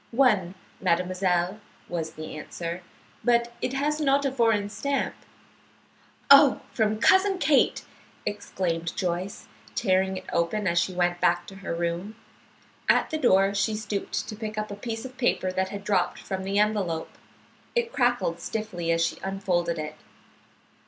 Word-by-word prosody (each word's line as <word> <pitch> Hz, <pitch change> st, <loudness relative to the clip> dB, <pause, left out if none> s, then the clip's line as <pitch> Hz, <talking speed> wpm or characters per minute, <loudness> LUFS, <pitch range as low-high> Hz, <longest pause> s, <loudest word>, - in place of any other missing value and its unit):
"One, 215 Hz, -8 st, +3 dB, 0.2 s
mademoiselle," 180 Hz, +1 st, +1 dB, 0.3 s
was 165 Hz, -2 st, -3 dB
the 155 Hz, 0 st, -7 dB
answer. 170 Hz, +3 st, -5 dB, 0.4 s
"But 235 Hz, -1 st, +2 dB
it 255 Hz, -, -1 dB
has 300 Hz, +3 st, 0 dB
not 280 Hz, -1 st, +3 dB
a 275 Hz, -, +1 dB
foreign 225 Hz, -5 st, +2 dB
stamp." 280 Hz, +6 st, -1 dB, 1.2 s
"Oh, 280 Hz, -1 st, +8 dB
from 215 Hz, -2 st, +1 dB
Cousin 380 Hz, -, +4 dB
Kate!" 310 Hz, -6 st, +3 dB, 0.4 s
exclaimed 170 Hz, -5 st, -2 dB
Joyce, 180 Hz, +2 st, -2 dB, 0.3 s
tearing 190 Hz, -2 st, +2 dB
it -, -, -8 dB
open 185 Hz, +5 st, 0 dB
as 175 Hz, -2 st, +3 dB
she 170 Hz, +2 st, 0 dB
went 175 Hz, 0 st, 0 dB
back 175 Hz, 0 st, +2 dB
to 195 Hz, +2 st, -11 dB
her 190 Hz, -3 st, -4 dB
room. 170 Hz, +5 st, -3 dB, 0.7 s
At -, -, +4 dB
the 315 Hz, -, -1 dB
door 195 Hz, -6 st, +4 dB
she 200 Hz, +2 st, +1 dB
stooped 210 Hz, -2 st, -3 dB
to 215 Hz, -, -6 dB
pick 215 Hz, 0 st, -6 dB
up 215 Hz, 0 st, -3 dB
a -, -, -4 dB
piece 225 Hz, +2 st, -5 dB
of 260 Hz, 0 st, -10 dB
paper 190 Hz, -7 st, +1 dB
that 190 Hz, 0 st, -1 dB
had 200 Hz, 0 st, -6 dB
dropped 195 Hz, -4 st, +1 dB
from 190 Hz, -1 st, -5 dB
the 195 Hz, +1 st, -1 dB
envelope. 205 Hz, -6 st, +1 dB, 0.6 s
It 475 Hz, -1 st, 0 dB
crackled 245 Hz, -10 st, +1 dB
stiffly 180 Hz, -4 st, -3 dB
as 165 Hz, 0 st, +3 dB
she -, -, -3 dB
unfolded 180 Hz, -3 st, -1 dB
it. 155 Hz, 0 st, -5 dB
195 Hz, 150 wpm, -26 LUFS, 175-230 Hz, 1.2 s, Oh